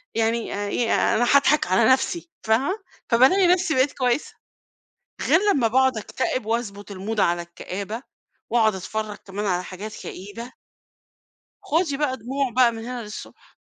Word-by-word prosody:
يعني 225 0 0
آآ 205 0 -3
إيه 230 +1 +1 0.2
أنا 240 - +2
هاضحك 285 -2 +4
على 190 +6 +4
نفسي، 330 +6 +1
فاهمة؟ 275 - +1 0.3
فبالاقي 270 +11 +5
نفسي 360 -2 +3
بقيت 260 +1 +3
كويسة. 250 +1 0 0.9
غير 325 - +4
لمّا 240 -5 +2
باقعد 260 0 +3
أكتئب 255 +2 -2
وأضبط 210 -3 -3
الMood 205 +3 -4
على 175 -2 +2
الكآبة، 200 +7 -6 0.5
وأقعد 220 -4 +3
أتفرج 215 +3 -4
كمان 205 +2 -4
على 180 -2 0
حاجات 205 +4 -8
كئيبة 225 +6 -8 1.1
خدي 315 -2 0
بقى 275 -3 0
دموع 260 +3 -2
بقى 245 -2 +5
من 225 0 -7
هنا 245 -1 -5
للصبح. 210 0 -11
235 Hz, 145 wpm, -23 LUFS, 210-265 Hz, 1.1 s, فبالاقي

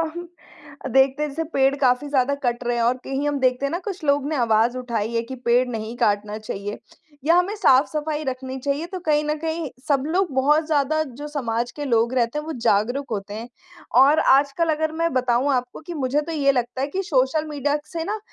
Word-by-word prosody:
हम 350 0 -6 0.6
देखते 270 +2 +3
हैं 300 - -2
जैसे 325 +4 -3
पेड़ 270 0 +3
काफ़ी 255 +3 +2
ज़्यादा 275 0 +2
कट 240 0 -1
रहे 240 0 0
हैं 230 - +1
और 245 +2 +2
कहीं 275 +2 -2
हम 290 -1 -1
देखते 255 +1 +1
हैं 280 - -2
ना 345 - -2
कुछ 380 -5 -5
लोग 285 -1 +2
ने 310 - -1
आवाज़ 235 0 +2
उठाई 235 -3 -3
है 230 - +1
कि 260 +3 -7
पेड़ 245 +2 +3
नहीं 225 0 -5
काटना 210 -2 0
चाहिए। 205 -1 -5 0.5
या 335 +2 +5
हमें 370 +4 +2
साफ-सफाई 300 -1 +2
रखनी 260 0 -4
चाहिए 285 +4 -2
तो 370 0 -6
कहीं 300 -1 +2
न 300 0 0
कहीं 320 -2 -3 0.2
सब 275 -2 +2
लोग 355 -1 0
बहुत 300 +4 +3
ज़्यादा 310 0 +1
जो 290 +1 -8
समाज 240 -4 -2
के 295 -1 -6
लोग 235 -1 +2
रहते 245 +3 0
हैं 300 - -7
वो 320 - -4
जागरूक 245 +8 +1
होते 205 -1 -4
हैं। 225 +2 -6 0.5
और 290 +3 +5
आजकल 280 +5 +3
अगर 315 0 -1
मैं 335 - +2
बताऊँ 255 +2 +1
आपको 250 +3 -3
कि 345 - -4
मुझे 285 0 0
तो 330 - -6
ये 280 -3 +3
लगता 250 0 -2
है 275 - 0
कि 380 +6 -3
सोशल 285 0 +1
मीडिया 290 0 0 0.2
से 330 - -2
ना 420 +5 -3
275 Hz, 220 wpm, -23 LUFS, 245-300 Hz, 0.6 s, या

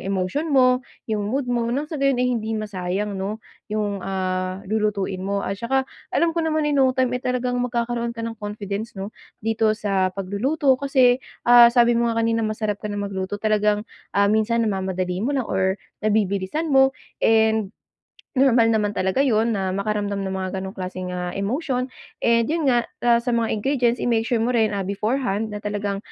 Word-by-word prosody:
emotion 195 - -2
mo, 255 -2 +4 0.2
yung 210 -2 -2
mood 270 +4 -1
mo. 240 -1 -1
Nang 275 +5 -1
sa 305 -2 -6
gayon 275 -1 +3
ay 250 0 +1
hindi 225 -1 -2
masayang 200 -1 -3
'no 200 +3 -4 0.2
yung, 210 -2 -2
ah, 185 0 -2
lulutuin 205 -2 -1
mo. 200 +1 -2
At 195 +2 -4
saka 265 +3 +1 0.2
alam 335 -1 +1
ko 335 - 0
naman, 315 -1 0
in 290 -2 +2
no 260 0 +3
time, 255 -1 +2
eh, 250 - -1
talagang 250 -1 -1
magkakaroon 235 -1 -2
ka 230 - -4
ng 225 -1 -6
confidence 205 +1 -5
'no, 195 +3 -5 0.3
dito 220 -1 +1
sa 195 -3 +1
pagluluto 255 +10 +1
kasi, 260 -2 +3 0.2
ah, 240 0 +9
sabi 240 0 +4
mo 235 0 +2
nga 230 0 0
kanina 230 0 +1
masarap 215 -1 -2
ka 210 - -4
na 205 - -4
magluto. 200 -1 -3
Talagang, 210 0 +1 0.3
ah, 200 +1 +4
minsan 230 +2 +2
namamadali 190 -3 -2
mo 275 +5 0
lang 255 - 0
or 190 -1 0 0.2
nabibilisan 210 - 0
mo, 265 0 +5 0.2
and 220 -2 +3 0.7
normal 235 -4 +5
naman 210 -2 +1
talaga 190 +6 0
yun 225 -2 +2
na 190 -1 -1
makaramdam 200 0 -1
ng 190 - -3
mga 190 0 -2
gano'ng 190 +2 -6
klaseng, 185 -1 -5
ah, 180 0 -3
emotion. 255 +5 -1 0.4
And 230 -1 +3
yun 320 -1 0
nga, 240 -1 +2 0.2
ah, 235 -1 +5
sa 245 - -1
mga 230 -2 +1
ingredients, 245 0 +1
i-make 230 -2 +2
sure 240 - +1
mo 240 - +1
rin, 220 -2 +3
ah, 195 -2 -3
beforehand 215 +1 -1
na 210 - -5
talagang, 205 -1 -3
220 Hz, 185 wpm, -23 LUFS, 200-245 Hz, 0.7 s, ah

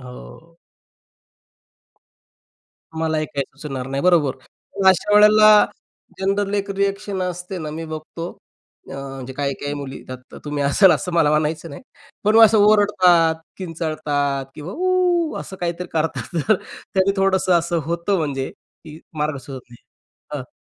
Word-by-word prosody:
हो. 125 - -13 2.4
मला 160 -1 -1
हे 155 - -1
काही 140 -2 -3 0.2
सुचणार 135 -4 -5
नाही, 135 +1 -3
बरोबर. 165 -7 +3 0.4
पण 195 - +1
अशा 200 +2 +3
वेळेला 210 0 +7 0.5
जनरल 200 +1 0
एक 200 0 -2
रिएक्शन 200 0 -2
असते 180 +1 -5
ना, 155 -2 -5
मी 160 +2 -6
बघतो, 160 +2 -7 0.6
अ, - - -7
म्हणजे 135 -1 -7
काही 140 0 -2
काही 145 0 -3
मुली 140 -2 -6
येतात, 130 0 -11
तुम्ही 145 -1 -2
असाल 180 +7 +5
असं 180 -2 -2
मला 165 -3 +3
मानायचं 155 +2 -1
नाही, 140 - -10 0.4
पण 215 +2 +4
असं 220 0 +5
ओरडतात, 190 -6 +4 0.2
किंचाळतात 155 -5 -2
किंवा 155 +5 -8
उ 360 -2 +1
असं 190 - -9
काहीतरी 175 +1 -3
करतात, 160 +2 -2
तर 215 - +6 0.4
त्याने 190 0 +3
थोडंसं 190 -1 +2
असं 170 0 -1
होतं, 170 +4 0
म्हणजे 140 -4 -2
की 155 -1 -16 0.2
मार्ग 150 -1 -1
सुचत 130 0 -9
नाही. 120 - -17 0.5
हं. 130 - -8
165 Hz, 145 wpm, -21 LUFS, 145-195 Hz, 2.4 s, वेळेला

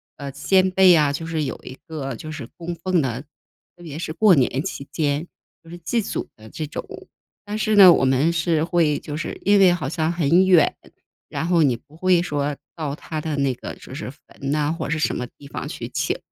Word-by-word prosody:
呃， 140 -1 -7
先 185 +7 +2
辈 185 -1 +6
啊， 150 -3 +3
就 160 +3 -5
是 160 -2 -1
有 - - -4
一 130 - -9
个 140 -5 -5
就 155 +7 -8
是 145 -6 -7
供 175 0 -5
奉 170 +1 0
的， 125 -2 -2 0.5
特 175 - -16
别 155 -2 -7
是 155 - -4
过 200 +3 +5
年 135 -2 +2
期 145 -7 -6
间 150 +1 -1 0.3
就 165 - -17
是 175 - -8
祭 200 +8 -1
祖 - - -4
的 110 0 -13
这 155 - -5
种。 - - -6 0.6
但 210 +1 -4
是 215 0 +1
呢， 190 -3 +10
我 135 - +3
们 135 +5 +3
是 160 -1 +1
会 165 -3 +2
就 150 0 -6
是 170 - -5
因 205 +1 +4
为 185 -2 +6
好 155 -7 -3
像 160 0 -1
很 170 +2 +3
远， 175 -5 +5 0.5
然 - - -3
后 170 -1 +3
你 130 -4 +3
不 145 +6 -17
会 180 0 +3
说 145 -4 -2 0.2
到 150 -3 -3
他 155 0 -6
的 155 -1 -3
那 140 -2 +1
个 125 - -8
就 - - -12
是 140 - -6
坟 140 0 -8
哪 150 0 +1
或 160 -2 -4
者 155 - -1
什 155 - 0
么 125 - -4
地 145 - -15
方 140 - -6
去 - - -6
请。 - - -1
160 Hz, 245 characters per minute, -22 LUFS, 140-175 Hz, 0.6 s, 呢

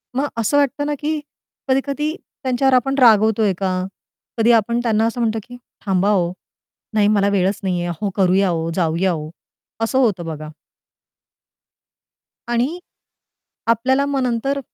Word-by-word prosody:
मग 280 +2 +1
असं 230 +6 +1
वाटत 285 0 +1
ना, 295 - -1
की 305 +1 -1 0.5
कधी-कधी 280 +4 0 0.3
त्यांच्यावर 260 +1 +2
आपण 265 +2 +2
रागवतोय 220 -3 +5
का? 185 -1 -1 0.5
कधी 230 +1 +4
आपण 235 +1 +2
त्यांना 225 -2 +2
असं 230 +2 -4
म्हणतो 225 -1 0
की 245 +2 -12 0.3
"थांबा 195 0 +2
हो! 180 -4 +2 0.6
नाही 210 -1 +3
मला 200 -1 +3
वेळच 195 0 +1
नाहीये. 180 -2 -1
अहो, 175 +4 -3
करूया 190 0 +3
हो! 165 -1 -1
जाऊया 175 +1 +1
हो!" 155 -2 -4 0.5
असं 225 +3 0
होतं 205 -9 +1
बघा. 155 -1 -6 2.0
आणि 245 +9 -1 0.9
आपल्याला 260 +4 +2
मग 275 -2 -1 0.2
तर 280 +1 0
220 Hz, 140 wpm, -20 LUFS, 190-260 Hz, 2.0 s, रागवतोय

